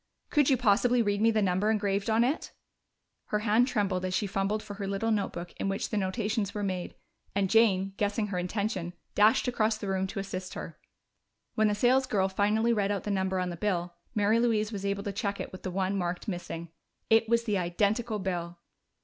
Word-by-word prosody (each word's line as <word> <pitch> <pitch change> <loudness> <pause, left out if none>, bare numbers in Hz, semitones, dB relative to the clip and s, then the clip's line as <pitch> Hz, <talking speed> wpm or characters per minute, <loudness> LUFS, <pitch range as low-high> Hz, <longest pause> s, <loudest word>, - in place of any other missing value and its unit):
"Could 295 -2 +4
you 265 - +4
possibly 240 +1 +3
read 205 -1 0
me 225 - +5
the 215 -2 +2
number 190 +3 +1
engraved 200 -1 0
on 225 +1 +4
it?" 270 +6 -1 0.7
Her 210 - 0
hand 225 +3 +3
trembled 200 -7 0
as 185 0 -1
she 210 - +1
fumbled 195 +2 -1
for 210 - -7
her 200 -1 -5
little 200 +3 -1
notebook 180 -4 -2
in 195 - -1
which 195 - -2
the - - -1
notations 205 +1 -1
were 205 - -2
made, 185 -2 -3 0.4
and 195 -2 +1
Jane, 195 -4 +4
guessing 210 +1 0
her 180 -2 -2
intention, 185 -1 -2 0.2
dashed 215 +4 +4
across 220 -3 +1
the 210 - -6
room 190 0 0
to 195 - -5
assist 185 -1 -5
her. - - -7 0.7
When 215 0 +3
the 210 - +1
salesgirl 245 -4 +2
finally 210 +4 +2
read 205 -3 +1
out 200 -2 -2
the 210 - -2
number 190 -1 0
on 180 -1 -1
the - - -5
bill, 175 -3 -1 0.2
Mary 210 +2 +3
Louise 220 -2 +1
was 200 -2 -3
able 200 0 -1
to 205 - -3
check 200 -1 -2
it - - -5
with 185 - -10
the 185 - -4
one 190 +1 -1
marked 180 +2 -2
"missing." 170 -3 -5 0.4
It 225 0 +5
was 235 0 +3
the 210 -4 0
identical 210 +6 0
bill! 175 -3 -3
205 Hz, 210 wpm, -29 LUFS, 190-220 Hz, 0.7 s, me